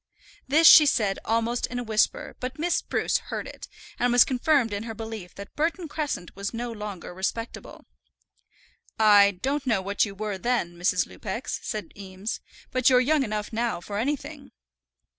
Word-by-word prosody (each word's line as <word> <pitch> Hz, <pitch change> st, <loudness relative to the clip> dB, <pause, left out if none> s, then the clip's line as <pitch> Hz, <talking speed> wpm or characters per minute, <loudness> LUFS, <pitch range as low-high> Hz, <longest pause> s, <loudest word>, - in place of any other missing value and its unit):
This 310 Hz, +4 st, +5 dB
she 300 Hz, -1 st, +10 dB
said 205 Hz, -7 st, +1 dB
almost 230 Hz, +2 st, 0 dB
in 250 Hz, -, -6 dB
a 245 Hz, -, -2 dB
whisper; 215 Hz, -2 st, 0 dB
but 255 Hz, +1 st, -5 dB
Miss 335 Hz, +3 st, 0 dB
Spruce -, -, 0 dB
heard -, -, -6 dB
it, -, -, -10 dB, 0.3 s
and 245 Hz, 0 st, +2 dB
was 245 Hz, 0 st, +7 dB
confirmed 255 Hz, -3 st, +1 dB
in 205 Hz, -, -3 dB
her 225 Hz, 0 st, -6 dB
belief 220 Hz, -5 st, -7 dB
that 200 Hz, 0 st, -10 dB
Burton 330 Hz, +3 st, -1 dB
Crescent 290 Hz, -, -4 dB
was 200 Hz, +3 st, -4 dB
no 240 Hz, +1 st, -4 dB
longer 210 Hz, -5 st, -7 dB
respectable. 195 Hz, +5 st, -5 dB, 1.1 s
"I 205 Hz, -2 st, +7 dB
don't 275 Hz, +1 st, -1 dB
know 225 Hz, -5 st, +2 dB
what 200 Hz, +1 st, +1 dB
you 200 Hz, -2 st, -3 dB
were 205 Hz, -1 st, -4 dB
then, 230 Hz, -5 st, -1 dB
Mrs. 180 Hz, 0 st, +1 dB
Lupex," 220 Hz, +5 st, -5 dB
said 215 Hz, -1 st, -5 dB
Eames; 195 Hz, +2 st, -6 dB, 0.3 s
"but 255 Hz, 0 st, +3 dB
you're 250 Hz, -1 st, +5 dB
young 290 Hz, +4 st, +2 dB
enough 215 Hz, -3 st, -3 dB
now 230 Hz, -3 st, -1 dB
for 200 Hz, +4 st, -5 dB
anything." 280 Hz, +5 st, -4 dB
225 Hz, 170 wpm, -26 LUFS, 200-255 Hz, 1.1 s, she